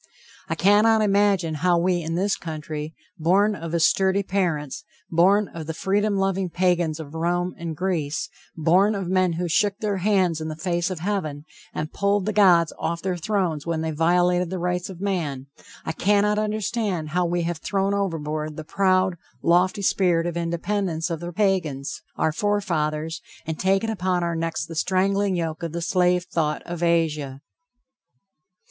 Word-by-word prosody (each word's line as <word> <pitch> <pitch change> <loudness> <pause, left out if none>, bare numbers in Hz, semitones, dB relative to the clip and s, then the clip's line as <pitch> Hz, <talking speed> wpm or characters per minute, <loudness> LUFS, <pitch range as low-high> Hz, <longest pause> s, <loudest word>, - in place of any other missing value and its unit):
I 165 - 0
cannot 210 +5 +4
imagine 200 -5 +2
how 180 -1 +3
we 175 0 +1
in 165 +1 -3
this 195 +3 +1
country, 155 -1 -6 0.2
born 195 +6 +3
of 165 -2 -3
sturdy 190 +3 +3
parents, 170 -8 -2 0.3
born 195 +5 +4
of 160 -2 -8
the 160 - -4
freedom 205 +3 +1
loving 195 -1 0
Pagans 175 -2 +1
of 150 -2 -8
Rome 175 +2 -1
and 165 -2 -6
Greece, 165 -5 -1 0.3
born 185 +7 +3
of 195 -3 -3
men 185 -2 +2
who 175 +2 -2
shook 195 +4 +1
their 210 -3 -1
hands 185 -4 +1
in 155 - -3
the 155 - -4
face 175 +2 -1
of 180 -4 -5
heaven, 155 -7 -2 0.3
and 155 +1 -5
pulled 200 -1 +1
the 215 - -1
gods 180 -5 +5
off 170 0 -2
their 185 -1 -1
thrones 175 -5 -1
when 165 -1 -1
they 160 0 -2
violated 175 +2 +2
the 185 - -3
rights 180 +1 -2
of 185 -1 -9
man, 160 -10 -2 0.4
I - - -1
cannot 205 +4 +2
understand 210 -5 -2
how 175 +2 +1
we 175 0 0
have 170 -1 -2
thrown 195 +3 0
overboard 155 -6 -2
the 155 - -5
proud, 185 +2 +2 0.3
lofty 185 +4 +3
spirit 175 -3 +2
of 175 -1 -3
independence 170 0 -2
of 165 - -2
the 175 +1 -6
Pagans, 175 -8 -1
our 160 - +1
forefathers, 160 -5 -1 0.2
and 160 -1 -4
taken 195 +4 +1
upon 185 -4 0
our 170 -1 -1
necks 165 0 -2
the 165 - -9
strangling 190 +3 +1
yoke 165 -2 -3
of 165 -2 -4
the 170 - -2
slave 180 0 +2
thought 165 -5 -1
of 175 -1 -6
Asia! 155 -5 0
175 Hz, 170 wpm, -24 LUFS, 160-195 Hz, 0.4 s, gods